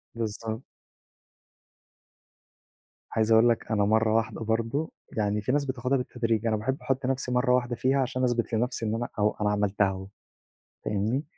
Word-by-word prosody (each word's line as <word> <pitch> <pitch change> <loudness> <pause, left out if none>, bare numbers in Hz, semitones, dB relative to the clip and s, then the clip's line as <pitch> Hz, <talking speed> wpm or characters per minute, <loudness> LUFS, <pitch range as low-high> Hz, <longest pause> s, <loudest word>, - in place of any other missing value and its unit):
بالضبط. 110 0 -3 2.5
عايز 110 0 +1
أقول 115 +2 +6
لك 115 0 -1
أنا 105 -2 +3
مرّة 110 +1 +3
واحدة 115 0 0
برضه، 115 +7 -1 0.3
يعني 105 0 +1
في 120 - -1
ناس 145 +1 +1
بتاخدها 130 0 0
بالتدريج 115 -3 -1
أنا 110 - +2
باحب 130 +6 -1
أحط 135 0 -1
نفسي 130 -1 -1
مرّة 125 0 +3
واحدة 120 -1 0
فيها 135 +3 +2
عشان 130 0 -1
أثبت 120 -2 0
لنفسي 115 0 0
إن 110 - 0
أنا 120 +1 -2
أو 105 0 +2
أنا 105 - +2
عملتها 105 -1 +2
أهو 95 0 -5 0.8
فاهمني، 110 +7 0
115 Hz, 160 wpm, -27 LUFS, 110-125 Hz, 2.5 s, أقول